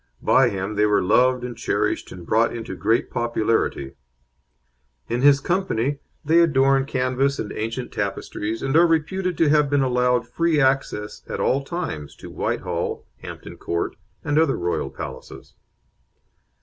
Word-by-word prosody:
By - - +4
him 100 +2 -4
they 105 0 +4
were 105 -2 +2
loved 125 +6 +3
and 125 -1 -5
cherished, 115 - -1
and 90 -2 -10
brought 115 +5 +2
into 115 -4 -6
great 110 +7 0
popularity; 115 - -1 1.1
in 120 +2 -1
his 140 0 +6
company 145 -6 -1 0.3
they 165 +3 +4
adorn 135 -4 +3
canvas 130 +1 0
and 105 - -4
ancient 115 +3 -4
tapestries, 105 +2 -3
and 135 - -1
are 170 +1 +6
reputed 170 +2 0
to 160 - +3
have 150 -1 +3
been 145 -1 +2
allowed 125 -1 +1
free 165 -2 +1
access 130 -6 0
at - - -4
all 135 +1 +1
times 135 - -5
to - - -11
Whitehall, - - -3
Hampton - - -10
Court, 85 0 -3 0.3
and 145 +1 +1
other 160 -4 +2
royal 85 0 -2
palaces. - - -9
130 Hz, 150 wpm, -23 LUFS, 110-145 Hz, 1.1 s, his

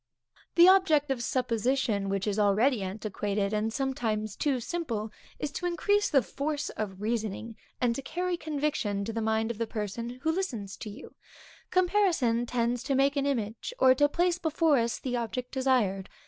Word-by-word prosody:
The 345 +1 +8
object 315 -7 +5
of 255 -3 -1
supposition, 235 -4 0
which 195 0 -1
is 210 0 -1
already 210 +4 +3
antiquated, 200 +1 -2
and 215 +1 0
sometimes 220 -5 -2
too 275 -4 0
simple, 230 -7 -3 0.3
is 295 - -3
to 355 +4 -3
increase 410 +4 +1
the 275 -3 +4
force 295 +1 -3
of 195 -3 -5
reasoning, 220 0 -2 0.2
and 245 -2 +2
to 275 - -4
carry 355 +6 -2
conviction 290 - -2
to 225 - -4
the 225 - -2
mind 220 +1 +1
of 230 - -8
the 230 - -1
person 230 +3 -4
who 320 - +2
listens 245 - -3
to 215 - -7
you; 205 - -11 0.6
comparison 350 - +2
tends 240 0 0
to 275 - -1
make 275 +2 +3
an 280 0 +1
image, 235 - -3
or 260 0 +6
to 290 +3 +3
place 350 +2 +1
before 320 -3 +2
us 230 0 0
the 250 -2 -3
object 245 +2 -4
described. 245 -8 +1
245 Hz, 175 wpm, -29 LUFS, 215-295 Hz, 0.6 s, The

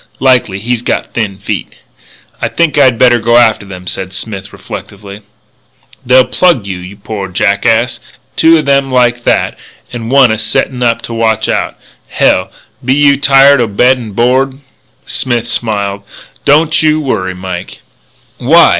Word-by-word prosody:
"Likely. 125 -7 +2
He's 115 +3 -2
got - - -3
thin 105 -5 -3
feet." - - -5 0.7
"I - - 0
think 170 -3 0
I'd 130 -5 +4
better 120 0 +4
go 120 +1 +2
after 110 -4 +2
them," 90 -1 -10
said 95 +1 -5
Smith, 100 0 -7
reflectively. 100 0 -10 0.8
"They'll 130 +1 +4
plug 130 - +1
you, 95 -2 -5
you 90 +2 -10
poor 100 -1 -6
jackass 110 +6 0 0.4
two 165 0 +4
o' - - +1
them 140 -1 +1
like 120 -2 +1
that, - - 0 0.3
and 115 -2 -5
one 135 -3 +4
a 110 - -2
settin' 110 +3 -2
up 115 -1 0
to 115 - -6
watch 110 -1 0
out. - - -2 0.3
Hell! - - +1 0.3
Be 130 +2 +1
you 145 -1 +4
tired 140 -1 +5
o' 120 - +1
bed 125 +5 +2
an' 110 -4 -8
board?" 130 +4 +1 0.5
Smith 120 -2 -1
smiled: 100 -4 -1 0.4
"Don't 155 +3 +3
you 155 0 +2
worry, 95 -11 -2
Mike." 90 -1 -7 0.6
"Why? 165 +7 +5
120 Hz, 155 wpm, -11 LUFS, 100-135 Hz, 0.8 s, tired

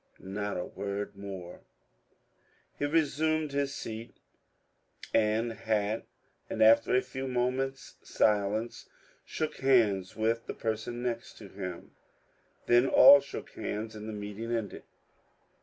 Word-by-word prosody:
Not 100 +2 -4
a 90 - -3
word 100 0 -5
more. 95 -3 -8 1.2
He 145 - +1
resumed 155 0 +1
his 140 0 -1
seat 115 +1 -7 1.0
and 110 +1 +2
hat, 110 0 -1 0.4
and - - +1
after 115 +3 +5
a 130 - +3
few 130 +1 -5
minutes' 130 +2 -2
silence 105 +2 0 0.4
shook 155 - -3
hands 110 -9 +2
with 115 +1 0
the - - -5
person 115 +2 -3
next 120 -2 -4
him; 95 -4 -8 0.7
then 120 +2 +4
all 140 +2 +9
shook 140 - -8
hands 110 +1 -5
and 105 +1 -7
the - - -5
meeting 105 +2 -6
ended. 115 -4 -3
115 Hz, 120 wpm, -30 LUFS, 105-130 Hz, 1.2 s, all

